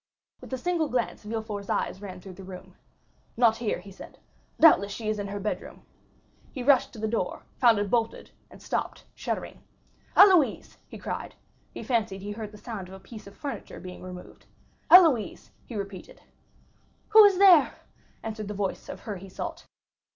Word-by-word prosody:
With -, -, -12 dB
a 260 Hz, -, -1 dB
single 335 Hz, +2 st, -1 dB
glance 245 Hz, -2 st, -2 dB
Villefort's 215 Hz, -2 st, -5 dB
eye -, -, 0 dB
ran 190 Hz, -3 st, -8 dB
through 185 Hz, +1 st, -11 dB
the 195 Hz, -, -11 dB
room. 185 Hz, 0 st, -10 dB, 0.6 s
"Not 230 Hz, -2 st, +4 dB
here," 230 Hz, -3 st, -1 dB
he 195 Hz, +2 st, -12 dB
said; 190 Hz, -, -12 dB, 0.4 s
"doubtless 205 Hz, -, +6 dB
she 215 Hz, +1 st, -4 dB
is 215 Hz, -1 st, -1 dB
in 200 Hz, -, -3 dB
her 200 Hz, +1 st, -5 dB
bedroom." 210 Hz, +2 st, -5 dB, 0.7 s
He 255 Hz, -, -5 dB
rushed 265 Hz, -1 st, +4 dB
towards 220 Hz, -, -10 dB
the -, -, +1 dB
door, 205 Hz, -6 st, -2 dB, 0.2 s
found 235 Hz, -4 st, +5 dB
it 205 Hz, -1 st, -2 dB
bolted, 230 Hz, -2 st, -1 dB, 0.2 s
and -, -, -15 dB
stopped, -, -, -3 dB
shuddering. -, -, -5 dB, 0.6 s
"Héloïse!" 370 Hz, -7 st, +5 dB
he -, -, -10 dB
cried. -, -, -6 dB, 0.4 s
He -, -, -8 dB
fancied 220 Hz, -6 st, -1 dB
he 205 Hz, -, -5 dB
heard 210 Hz, 0 st, -6 dB
the 210 Hz, -, -12 dB
sound 210 Hz, -4 st, -7 dB
of 190 Hz, -, -11 dB
a -, -, -11 dB
piece 215 Hz, +1 st, -12 dB
of 200 Hz, -, -14 dB
furniture 285 Hz, -2 st, -6 dB
being 180 Hz, 0 st, -9 dB
removed. 180 Hz, -1 st, -11 dB, 0.4 s
"Héloïse!" 315 Hz, -, +5 dB, 0.2 s
he 235 Hz, -, -8 dB
repeated. 195 Hz, -2 st, -7 dB, 0.9 s
"Who 435 Hz, 0 st, +9 dB
is 400 Hz, -2 st, +5 dB
there?" 360 Hz, -7 st, +6 dB, 0.5 s
answered 215 Hz, -2 st, -5 dB
the 210 Hz, -, -5 dB
voice 195 Hz, -1 st, -3 dB
of -, -, -7 dB
her 210 Hz, -3 st, -5 dB
he 190 Hz, +2 st, -11 dB
sought. -, -, -7 dB
215 Hz, 180 wpm, -27 LUFS, 195-250 Hz, 0.9 s, Who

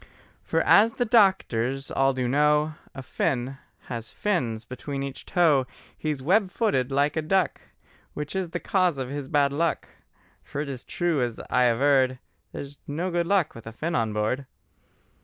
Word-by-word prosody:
For -, -, 0 dB
as 220 Hz, +3 st, +5 dB
the 245 Hz, -, 0 dB
doctors 135 Hz, -, +2 dB
all 135 Hz, 0 st, +3 dB
do 130 Hz, -1 st, -1 dB
know, 150 Hz, +3 st, +3 dB, 0.2 s
A 135 Hz, -, -7 dB
Finn 130 Hz, +1 st, -2 dB, 0.2 s
has 115 Hz, -2 st, -6 dB
fins 120 Hz, -, -1 dB
between 135 Hz, +2 st, -5 dB
each 135 Hz, -1 st, -7 dB
toe: 150 Hz, -7 st, +3 dB, 0.3 s
He 155 Hz, -, -4 dB
is 140 Hz, -4 st, -3 dB
web 190 Hz, +6 st, +3 dB
footed 165 Hz, -, 0 dB
like 145 Hz, +2 st, +2 dB
a 160 Hz, -, +1 dB
duck; 175 Hz, +1 st, +1 dB, 0.5 s
Which 150 Hz, +4 st, -5 dB
is 190 Hz, -3 st, -1 dB
the -, -, -3 dB
cause 180 Hz, -6 st, +1 dB
of 130 Hz, -2 st, -4 dB
his 140 Hz, -1 st, -5 dB
bad 140 Hz, -1 st, +2 dB
luck: 165 Hz, +3 st, -1 dB, 0.5 s
For -, -, -7 dB
it 145 Hz, -1 st, -3 dB
is 130 Hz, -3 st, -6 dB
true, 175 Hz, -5 st, 0 dB
as 120 Hz, -2 st, -2 dB
I 125 Hz, 0 st, +4 dB
averred, 130 Hz, +1 st, +3 dB, 0.3 s
There's 140 Hz, 0 st, -8 dB
no 170 Hz, +6 st, -2 dB
good 170 Hz, 0 st, 0 dB
luck 190 Hz, -5 st, +2 dB
with 115 Hz, -1 st, -12 dB
a -, -, -5 dB
Finn 160 Hz, +9 st, -3 dB
on 115 Hz, -7 st, +1 dB
board. 110 Hz, +6 st, -1 dB
140 Hz, 175 wpm, -26 LUFS, 130-170 Hz, 0.5 s, as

